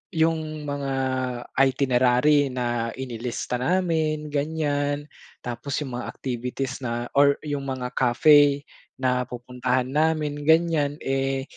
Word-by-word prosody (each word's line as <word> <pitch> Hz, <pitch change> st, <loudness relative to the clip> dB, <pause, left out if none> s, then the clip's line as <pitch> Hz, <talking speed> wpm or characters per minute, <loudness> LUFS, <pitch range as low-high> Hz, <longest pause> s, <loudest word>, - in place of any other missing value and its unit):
'yung 160 Hz, -1 st, 0 dB
mga 140 Hz, -1 st, -3 dB, 0.7 s
itinerary 135 Hz, +2 st, +3 dB
na 120 Hz, -2 st, -2 dB
inilista 125 Hz, -1 st, -4 dB
namin 155 Hz, -1 st, 0 dB
ganiyan, 145 Hz, -1 st, -1 dB, 0.4 s
tapos 125 Hz, +3 st, -3 dB
'yung 135 Hz, -, -7 dB
mga -, -, -5 dB
activities 125 Hz, +1 st, -4 dB
na 120 Hz, -2 st, -3 dB
or 140 Hz, 0 st, +6 dB
'yung 145 Hz, -2 st, -3 dB
mga 130 Hz, -2 st, -3 dB
cafe 140 Hz, +3 st, +5 dB, 0.4 s
na 125 Hz, -1 st, +1 dB
pupuntahan 125 Hz, +1 st, -2 dB
namin 150 Hz, -1 st, 0 dB
ganiyan, 160 Hz, -3 st, +3 dB
eh, 135 Hz, 0 st, 0 dB
140 Hz, 110 wpm, -24 LUFS, 125-150 Hz, 0.7 s, or